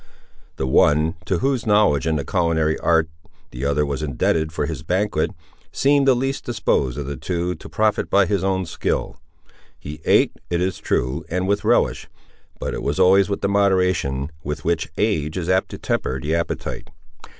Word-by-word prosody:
The 65 - -2
one, 75 +4 +3
to 90 +3 0
whose 130 +2 -1
knowledge 105 - +3
in 80 - +1
the 70 -2 -2
culinary 80 -3 +1
art 80 -1 +2 0.4
the 65 +3 -5
other 70 +1 +1
was 70 0 -3
indebted 75 +3 0
for 75 - -2
his 80 -4 -5
banquet, 90 +1 0 0.4
seemed 140 0 +3
the 130 - +6
least 135 +3 -2
disposed 70 - 0
of 70 - -4
the 70 +1 -4
two 90 +5 -2
to 80 - -11
profit 110 -1 0
by 100 0 +4
his 100 -1 -1
own 95 -1 0
skill. 80 - -2 0.6
He 75 +2 -9
ate, - - +4 0.2
it 85 - 0
is 90 -1 -1
true, 65 +6 -1
and 90 +2 -1
with 100 +1 0
a - - -3
relish; - - +2 0.5
but - - -3
it - - -4
was 75 +5 -2
always 95 +2 +5
with 100 - -2
the - - +1
moderation 90 -8 +1
with 75 +1 -5
which 85 -1 0
age 80 -7 0
is 90 -1 -3
apt 95 +1 +2
to - - -7
temper 65 - -2
the 75 +5 -2
appetite. 85 0 -3
85 Hz, 185 wpm, -21 LUFS, 75-100 Hz, 0.6 s, the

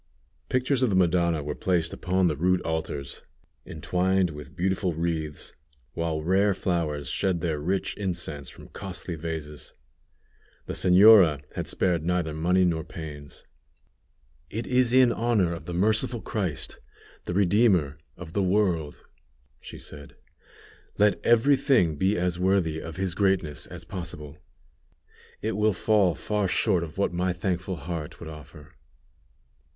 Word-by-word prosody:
Pictures 130 +1 +1
of 130 - +3
the 100 - +1
Madonna 85 -3 +2
were 75 +1 -3
placed 85 0 -1
upon 95 -1 0
the 80 -4 +1
rude 90 +5 +2
altars, 80 -4 -4 0.5
entwined 90 +3 0
with 75 -2 -10
beautiful 95 0 0
wreaths, 80 -2 -3 0.4
while 80 -2 -2
rare 95 +3 +2
flowers 80 -7 -2
shed 90 +5 0
their 80 -4 -1
rich 95 +6 -2
incense 85 -8 -3
from - - -14
costly 95 -2 -6
vases. 80 -2 -6 0.9
The - - -5
señora 90 -6 +6
had - - -4
spared 85 -4 +1
neither 85 -2 -1
money 90 +4 +2
nor 80 -2 0
pains. 75 -3 -9 1.1
"It 115 +6 -4
is 125 -1 +2
in 130 -1 +5
honor 110 -7 +1
of 85 - -8
the 90 - -5
Merciful 110 +4 +1
Christ 95 -11 -3 0.5
the 90 - -3
Redeemer 95 -7 +3 0.2
of 85 -2 -10
the 100 - +1
world," 90 -6 0 0.6
she - - -9
said; 70 -1 -12 0.8
"let 105 0 +2
every 120 +5 +5
thing 130 - +2
be 95 +7 +1
as 90 0 -1
worthy 90 -4 +1
of 80 0 -8
His 95 -2 -1
greatness 95 -6 0
as 85 -1 -9
possible; 80 -4 -7 1.0
it 110 0 -1
will 105 +1 +2
fall 100 -3 +2
far 105 +5 -1
short 95 -2 +1
of 80 0 -9
what 100 - 0
my 90 +1 0
thankful 90 +1 -2
heart 80 0 -6
would 85 - -8
offer." 75 -1 -12
90 Hz, 140 wpm, -26 LUFS, 80-100 Hz, 1.1 s, señora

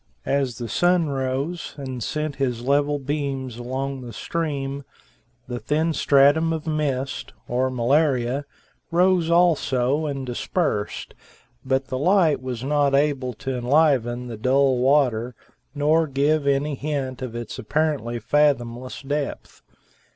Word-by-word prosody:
As 135 -3 0
the 120 -2 -5
sun 175 +4 +2
rose 135 +5 -3
and 130 -3 -5
sent 150 +4 -3
his 125 -3 -1
level 145 +2 +2
beams 135 -3 -3
along 130 +2 -4
the 120 -2 -8
stream, 140 -2 -3 0.6
the 120 -1 -4
thin 160 +5 0
stratum 145 +3 +4
of 160 -1 -3
mist, 145 -4 -2
or 130 +2 0
malaria, 130 +1 +1 0.4
rose 175 -1 +3
also 155 -4 +2
and 135 -2 -3
dispersed, 120 - -2 0.5
but 130 0 0
the 130 - -2
light 175 -2 +3
was 125 -2 -5
not 145 0 +2
able 140 -3 +1
to 130 +4 -4
enliven 125 -2 +2
the 120 -2 -6
dull 130 +2 +2
water 125 -3 +2 0.4
nor 155 +3 +3
give 140 +2 +1
any 140 +2 +1
hint 135 -2 -3
of 125 -3 -5
its 120 -1 -6
apparently 145 -2 -1
fathomless 125 0 0
depth. 145 0 -4
140 Hz, 130 wpm, -23 LUFS, 125-150 Hz, 0.6 s, stratum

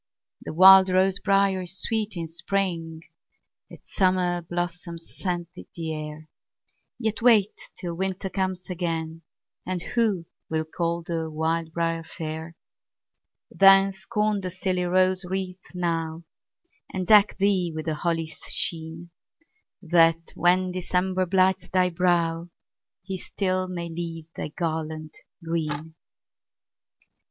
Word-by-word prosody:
The - - -6
wild 190 +1 +9
rose 190 +1 +3
briar 195 -1 +2
is 180 +1 -7
sweet 220 -4 -1
in 165 -1 -3
spring, 170 -2 -2 0.7
Its - - -15
summer 180 -2 +2
blossoms 175 0 -5
scent 175 -3 -3
the 165 -3 -6
air; 155 0 -7 0.7
Yet 220 -2 -2
wait 220 -4 +5 0.2
till 175 -3 -5
winter 190 +2 -2
comes 185 -1 -2
again, 165 -2 -3 0.4
And 185 0 -3
who 215 -8 +1 0.2
will 160 0 -1
call 170 +1 -2
the 165 -1 -3
wild 160 +1 -1
briar 165 0 -1
fair? 160 0 -6 1.0
Then, 195 0 +6
scorn 210 +1 -1
the 185 - -3
silly 185 0 -1
rose 185 +1 +3
wreath 185 0 -5
now, 165 -2 -2 0.7
And 185 -1 -3
deck 210 +1 +6
thee 190 -3 +1
with 155 0 -6
the 160 - -1
holly's 165 0 -2
sheen, 165 +1 -2 0.7
That, 165 -1 +3
when 180 +1 +2
December 185 +1 -1
blights 190 +1 +2
thy 180 -1 +2
brow, 170 -1 +1 0.5
He 190 0 -5
still 185 -1 -2
may 175 -2 -4
leave 165 -1 -6
thy - - -4
garland 155 -1 -4 0.3
green. 160 -1 -3
175 Hz, 120 wpm, -25 LUFS, 165-190 Hz, 1.0 s, wild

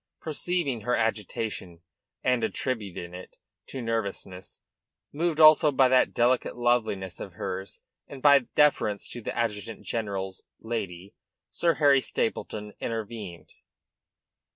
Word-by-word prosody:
Perceiving 155 -5 -2
her 125 +3 +1
agitation, 105 -5 -3 0.4
and 125 -2 +2
attributing 100 -8 -3
it 90 +1 -10 0.3
to 130 - -6
nervousness, 100 -4 -4 0.5
moved 160 +1 0
also 155 -1 +8
by 135 -1 +5
that 130 0 +4
delicate 125 +1 +1
loveliness 110 -7 0
of 95 - -7
hers, 95 +1 -5 0.3
and 140 - -9
by 140 +1 +7
deference 130 -6 +1
to 120 - -6
the - - -5
adjutant 110 -2 -2
generates 95 -4 -3 0.2
lady, 100 -5 -5 0.4
Sir 170 -1 +2
Harry 140 -3 +5
Stapleton 105 -3 -3
intervened. 110 -6 -5
115 Hz, 115 wpm, -27 LUFS, 100-130 Hz, 0.5 s, also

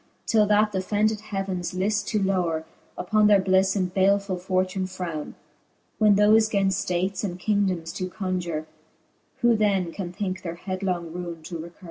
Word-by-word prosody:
Till 215 -2 +3
that 210 +1 +3
th'offended 210 +3 0
heavens 195 -4 -4
lift 205 +3 0
to 215 - 0
lowre 180 -5 0 0.3
Upon 215 +3 +3
their 205 -1 +6
blifTe, 190 +1 +2
and 185 -2 -1
balefull 195 -1 +2
fortune 185 0 -1
frowne. 175 -5 -5 0.6
When 210 -2 +5
thofe 215 +2 +5
gainft 195 -2 +2 0.2
ftatcs 185 +3 -1
and 180 -3 -3
kingdomes 185 -5 0
do 185 -1 -3
conjure, 180 -5 -3 0.8
Who 240 -1 +5
then 195 -5 +1
can 175 -1 -5
thinke 185 -1 -4
their 170 -2 -5
hedlong 180 -2 -3
ruine 170 -2 -6
to 170 +1 -6
recure 170 +2 -8
190 Hz, 155 wpm, -25 LUFS, 180-205 Hz, 0.8 s, their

